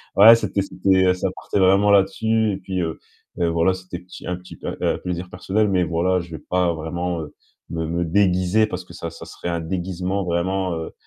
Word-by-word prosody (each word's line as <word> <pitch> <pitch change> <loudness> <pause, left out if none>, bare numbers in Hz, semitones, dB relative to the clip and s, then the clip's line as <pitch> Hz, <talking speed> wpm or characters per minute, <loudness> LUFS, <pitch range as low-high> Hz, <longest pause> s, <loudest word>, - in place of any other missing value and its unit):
Ouais, 110 +3 +10
c'était 110 -3 -1
c'était, 95 -1 +2
heu, 90 - +5
ça 90 +1 -2
partait - - -2
vraiment 95 +2 +5
là-dessus 110 +2 +2
et - - -3
puis, 95 -1 -4
heu, 80 -2 -3 0.4
voilà, 85 +1 +2
c'était 90 -1 -7
petit 90 +1 -12
un 90 - -1
petit 90 +1 -12
un, - - -3
heu, - - 0
plaisir 90 0 -4
personnel, 100 +4 0
mais 95 -2 +2
voilà, 85 +3 +1
je 85 -1 -8
vais 80 - -9
pas 90 -1 +2
vraiment, 85 +2 -3
heu, 75 - -9 0.4
me 80 -1 -3
me 85 +2 -1
déguiser 95 +3 +3
parce 90 -3 -5
que 85 - -14
ça, 85 -1 -5
ça 85 - -10
serait - - -8
un 85 -1 -1
déguisement 90 +3 -2
vraiment, 90 +2 0
heu 80 0 -5
90 Hz, 210 wpm, -22 LUFS, 85-95 Hz, 0.4 s, Ouais